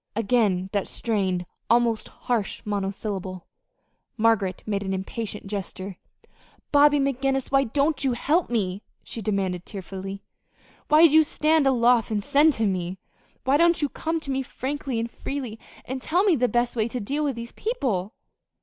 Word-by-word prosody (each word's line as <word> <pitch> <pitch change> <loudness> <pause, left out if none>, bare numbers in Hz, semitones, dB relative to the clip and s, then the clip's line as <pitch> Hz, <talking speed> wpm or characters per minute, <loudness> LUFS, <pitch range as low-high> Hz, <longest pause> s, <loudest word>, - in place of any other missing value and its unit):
Again 200 -4 +1
that 200 -2 0
strained, 190 -6 -1 0.2
almost 235 -1 +2
harsh 230 -5 -3
monosyllable. 195 -2 -3 0.7
Margaret 215 -5 +2
made 200 -2 -1
an 190 -1 -2
impatient 210 +2 -5
gesture. 195 -1 -5 0.7
"Bobby 290 0 +6
McGinnis, 270 -1 0
why 275 0 +4
don't 285 +4 +1
you 265 -2 +2
help 310 +8 +1
me?" 200 -5 -1 0.2
she 230 - -6
demanded, 190 -4 -1
tearfully. 195 0 -7 0.6
"Why 310 +2 +7
do 310 - +5
you 315 0 +8
stand 305 -1 +2
aloof 240 -3 +4
and 210 -2 -1
send 295 +6 +4
to 225 -3 0
me? 185 -2 -1 0.5
Why 270 +2 +3
don't 335 -1 +3
you 290 - +1
come 325 +3 -2
to 275 - -5
me 265 0 0
frankly 265 -1 -3
and 230 - -1
freely, 250 -5 -5 0.3
and 260 +1 -4
tell 350 +8 +2
me 390 -5 +4
the 250 -2 +2
best 240 0 0
way 220 -1 +1
to 245 +2 -4
deal 280 +8 -2
with 280 -4 0
these 235 0 -7
people?" 245 - -2
235 Hz, 160 wpm, -25 LUFS, 200-275 Hz, 0.7 s, you